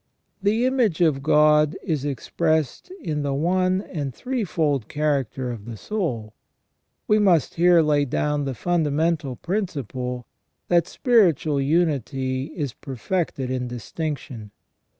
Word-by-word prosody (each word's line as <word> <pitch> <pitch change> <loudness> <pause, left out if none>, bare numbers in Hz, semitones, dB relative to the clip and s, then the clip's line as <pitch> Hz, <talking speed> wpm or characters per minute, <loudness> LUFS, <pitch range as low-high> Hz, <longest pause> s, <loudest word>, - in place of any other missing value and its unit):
The 215 +5 +2
image 250 -10 +1
of 155 -5 +3
God 150 0 +4
is 155 -7 -1
expressed 155 - -1
in 150 -2 -2
the 140 -1 -1
one 185 +5 +1
and 145 -10 -5
threefold 160 - -1
character 140 -4 -1
of 110 -4 -8
the 115 -2 -7
soul. 125 - -3 0.7
We 215 0 +4
must 180 -8 +3
here 175 -1 +5
lay 145 -1 +2
down 145 +2 -1
the 135 -2 -3
fundamental 155 -2 0
principle, 130 - -3 0.4
that 175 -1 +3
spiritual 170 - +3
unity 135 -4 0
is 140 -7 -3
perfected 135 0 -3
in 125 -1 -2
distinction. 125 -1 -5
150 Hz, 120 wpm, -23 LUFS, 130-175 Hz, 0.7 s, here